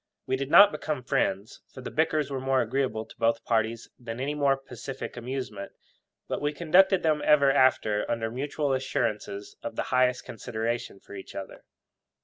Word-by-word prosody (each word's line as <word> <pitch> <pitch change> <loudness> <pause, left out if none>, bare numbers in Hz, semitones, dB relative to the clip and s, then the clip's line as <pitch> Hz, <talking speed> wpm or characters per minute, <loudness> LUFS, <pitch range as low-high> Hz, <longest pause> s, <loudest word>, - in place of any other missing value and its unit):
We 130 - 0
did 135 +1 -4
not 200 +6 +8
become 150 -3 -4
friends, 100 -3 -1
for 130 - -10
the 125 - -7
bickers 155 -2 0
were 135 - -2
more 130 0 +1
agreeable 120 -2 -1
to - - -16
both 115 0 +1
parties 115 0 0
than 120 -1 -7
any 140 +3 -1
more 140 -2 +2
pacific 135 0 -8
amusement; 120 -5 -5 0.5
but - - -3
we 145 +1 0
conducted 180 +4 +4
them 155 -2 +2
ever 140 -2 +5
after 130 -6 +2
under 115 -1 -1
mutual 140 +2 -2
assurances 105 -6 -3
of - - -6
the - - -1
highest 125 0 +2
consideration 115 -2 -4
for - - -14
each 95 -1 -9
other. 95 - -8
130 Hz, 170 wpm, -27 LUFS, 115-145 Hz, 0.5 s, not